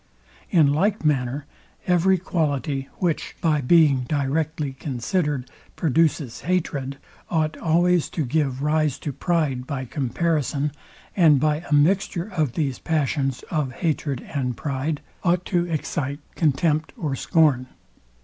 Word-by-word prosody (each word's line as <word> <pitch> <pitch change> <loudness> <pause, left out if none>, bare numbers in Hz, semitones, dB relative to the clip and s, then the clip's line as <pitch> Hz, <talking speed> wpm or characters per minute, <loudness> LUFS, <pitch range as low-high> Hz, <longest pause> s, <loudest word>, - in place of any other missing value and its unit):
In 150 -5 +4
like 195 +3 +1
manner 135 -1 0 0.4
every 180 +1 +3
quality, 145 -6 -1
which, 170 -4 -1
by 155 -3 +2
being 140 -2 +4
directly 145 0 -1
considered, 140 - -2 0.3
produces 155 -5 +1
hatred, 145 -6 -1 0.3
ought 155 -2 0
always 175 +1 +2
to 155 - +1
give 135 -1 0
rise 150 -2 +1
to 145 - -5
pride 145 -6 0
by 135 -3 -3
comparison, 145 +2 -1 0.4
and 160 -7 +6
by 150 +1 +2
a - - 0
mixture 180 +4 +2
of 150 -7 +1
these 140 -6 -1
passions 140 -4 -1
of 150 -5 -1
hatred 145 -5 -1
and 125 -4 -3
pride 145 +1 -2 0.2
ought 180 0 +2
to 175 -2 +1
excite 150 -3 -2 0.2
contempt 155 0 +1
or 145 -5 -2
scorn. 145 -4 +2
150 Hz, 125 wpm, -23 LUFS, 135-165 Hz, 0.4 s, and